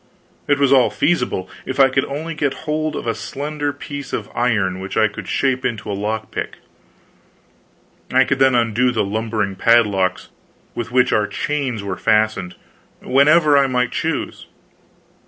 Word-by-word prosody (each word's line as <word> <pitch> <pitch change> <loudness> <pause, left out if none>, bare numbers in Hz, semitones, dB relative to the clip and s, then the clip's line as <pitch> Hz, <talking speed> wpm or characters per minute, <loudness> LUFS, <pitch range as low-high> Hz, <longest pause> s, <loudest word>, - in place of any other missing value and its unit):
It 145 - +3
was 140 -1 +3
all 130 -2 +5
feasible, 150 - 0 0.2
if 130 - -5
I 135 -1 +7
could 135 0 0
only 155 +4 -5
get 145 -3 -2
hold 155 0 -1
of - - -5
a 115 - 0
slender 145 +4 -4
piece 145 -1 -8
of - - -4
iron 105 -7 0
which 95 +1 -5
I 110 -1 +4
could 100 -1 -9
shape 130 -1 0
into 110 -4 -3
a - - -2
lock 110 +2 -3
pick. - - -5 1.5
I 130 +1 +5
could 135 0 -1
then 135 -1 +4
undo 120 +1 +2
the 115 -3 0
lumbering 105 -1 -2
padlocks 100 -4 +2 0.4
with 120 0 -5
which 125 0 +3
our 105 -1 +2
chains 135 -7 -3
were 95 -2 -4
fastened, 110 -4 +1 0.5
whenever 150 +3 +4
I 140 -1 +4
might 125 -1 0
choose. - - -3
125 Hz, 160 wpm, -19 LUFS, 110-140 Hz, 1.5 s, I